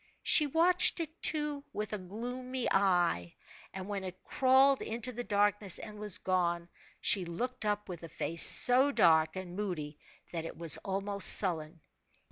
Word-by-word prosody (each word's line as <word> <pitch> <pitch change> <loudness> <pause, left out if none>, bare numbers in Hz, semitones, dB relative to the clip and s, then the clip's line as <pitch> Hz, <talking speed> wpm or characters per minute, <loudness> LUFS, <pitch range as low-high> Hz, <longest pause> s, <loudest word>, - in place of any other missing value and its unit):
She 300 - +3
watched 345 +5 +3
it, 320 0 -7
too, 295 -2 -1
with 215 0 -5
a 210 - -4
gloomy 245 +6 -6
eye, 175 - 0 0.4
and 190 0 -8
when 200 -2 -5
it 185 0 -9
crawled 265 +1 +2
into 235 +2 -4
the 245 0 -6
darkness 205 -2 +1
and 210 0 -10
was 210 -3 +5
gone, 175 -2 -2 0.3
she 195 - +2
looked 235 +9 -5
up 210 0 -2
with 175 -3 -9
a 165 - -10
face 165 +2 -2
so 260 +3 +3
dark 160 - +2
and 185 -1 -8
moody 160 -8 -6 0.3
that 165 -2 -5
it 165 - -9
was 165 -2 +4
almost 200 +1 +1
sullen. 165 -4 +2
200 Hz, 160 wpm, -30 LUFS, 175-250 Hz, 0.4 s, was